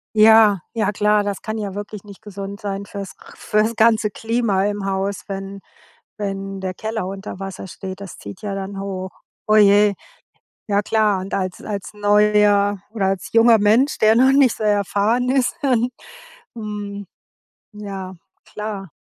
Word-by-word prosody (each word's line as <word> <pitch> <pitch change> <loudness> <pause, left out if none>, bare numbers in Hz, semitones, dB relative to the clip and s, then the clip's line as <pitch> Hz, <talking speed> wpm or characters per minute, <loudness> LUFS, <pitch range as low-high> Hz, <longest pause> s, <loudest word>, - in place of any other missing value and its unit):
Ja, 215 -2 +6
ja, 225 -3 0
klar, 210 0 +2
das 200 -1 -3
kann 220 0 -4
ja 200 -3 -4
wirklich 205 0 -7
nicht 200 -1 -13
gesund 200 -1 -7
sein 200 -1 -4
fürs 200 -1 -7 0.2
fürs 215 +2 0
ganze 220 -1 +3
Klima 225 -3 0
im 205 -1 -2
Haus, 195 0 -2
wenn 195 0 -6 0.6
wenn 195 -1 -4
der 185 -1 -4
Keller 220 -1 -4
unter 195 0 -7
Wasser 195 -1 -7
steht. 190 +1 -8
Das 195 -3 -9
zieht 100 0 -10
ja 205 -2 -3
dann 195 0 -5
hoch. 190 -1 -5 0.4
Oh 215 - +4
je. 205 0 +5 0.7
Ja 205 -1 +1
klar, 210 -2 +1
und 190 +1 -5
als 185 -2 -3
als 200 -3 -5
neuer 205 -1 +3
oder 215 -3 -1
als 190 -2 -2
junger 230 0 +6
Mensch, 220 +8 +3
der 215 +1 +5
noch 260 +3 +5
nicht 270 -4 +4
so - - -7
erfahren 210 +3 +1
ist 260 -1 +1
ähm 250 -4 +2 0.7
mhm, 205 -2 -6 0.7
ja, 195 -3 -7 0.4
klar. 210 -4 -6
205 Hz, 160 wpm, -20 LUFS, 195-215 Hz, 0.7 s, Ja